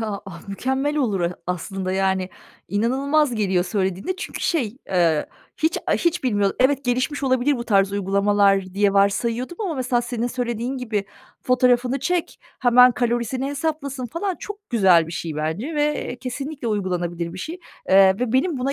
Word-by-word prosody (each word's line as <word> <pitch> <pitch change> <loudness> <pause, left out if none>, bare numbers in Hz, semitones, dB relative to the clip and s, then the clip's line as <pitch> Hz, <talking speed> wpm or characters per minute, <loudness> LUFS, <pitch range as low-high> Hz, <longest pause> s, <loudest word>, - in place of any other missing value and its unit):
Ya, 215 -3 -3 0.3
mükemmel 265 +8 -1
olur, 220 -10 0
e, 175 +1 -1
aslında 185 +1 -3
yani 190 -1 0 0.4
inanılmaz 265 - +1
geliyor 190 -4 +1
söylediğinde 195 - -2
çünkü 390 - -6
şey, 255 -9 0
eee, 170 -5 +2 0.3
hiç, 320 +2 +1
a - - +2
hiç 340 -5 0
bilmiyordum. 205 -5 +1
Evet, 275 +1 +3
gelişmiş 255 +4 -1
olabilir 260 +2 +2
bu 235 - -5
tarz 195 -3 +2
uygulamalar 200 -1 +2
diye 200 0 +3
varsayıyordum. 230 - +1
Ama 365 -7 -2
mesela 250 -2 0
senin 240 -1 -2
söylediğin 245 +1 -3
gibi 220 -6 -2 0.4
fotoğrafını 250 +1 +2
çek, 350 +5 -2 0.2
hemen 250 0 +6
kalorisini 240 +1 -1
hesaplasın 280 -3 -3
falan 355 - -3
çok 415 0 -9
güzel 190 -8 +5
bir 165 - -8
şey 160 -3 -4
bence 170 - -3
ve, 295 0 +2
eee, 250 - -5
kesinlikle 270 +1 -5
uygulanabilir 175 -4 -2
bir 185 - -8
şey, 325 - -6 0.3
eee, 190 0 +6
ve 245 -2 -1
benim 275 +3 +1
buna 270 +2 -1
240 Hz, 160 wpm, -22 LUFS, 195-270 Hz, 0.4 s, hemen